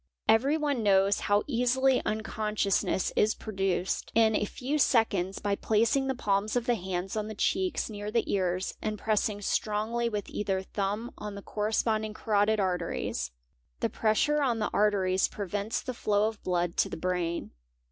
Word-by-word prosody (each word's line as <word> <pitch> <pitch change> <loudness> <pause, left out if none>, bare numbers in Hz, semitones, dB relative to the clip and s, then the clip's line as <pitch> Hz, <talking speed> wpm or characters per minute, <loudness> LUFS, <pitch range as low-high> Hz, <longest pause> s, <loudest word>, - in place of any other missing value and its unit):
— - - -60
Everyone 280 +4 +3
knows 200 -1 +3
how 205 +1 +2
easily 260 +1 +2
unconsciousness 215 -3 0
is 215 +1 +3
produced, 190 -3 -2
in 220 -1 +4
a 210 - +1
few. 270 +8 -3
seconds, 200 -8 +2
by 205 -1 0
placing 230 +6 +2
the 265 - 0
palms 205 -1 0
of 245 -1 0
the 245 - +3
hands 190 -2 -3
on 215 -1 -2
the 220 - -6
cheeks 370 - 0
near 210 -1 -5
the 230 +1 +1
ears, 185 -1 0
and 215 0 -2
pressing 210 -1 0
strongly 220 +4 0
with 210 -3 -3
either 190 -2 -2
thumb 205 +4 -3
on 210 -1 -6
the 200 - -8
corresponding 215 0 -1
carotid 215 0 +2
arteries", 175 - -1 0.5
'The - - 0
pressure 295 +8 +2
on 250 -5 +1
the 215 - -1
arteries 190 -3 +2
prevents 205 +2 -3
the 255 - -4
flow 210 -2 +1
of 220 -1 -6
blood 175 -1 -1
to - - +2
the - - -5
brain. 175 -1 -2
210 Hz, 165 wpm, -29 LUFS, 195-225 Hz, 0.5 s, in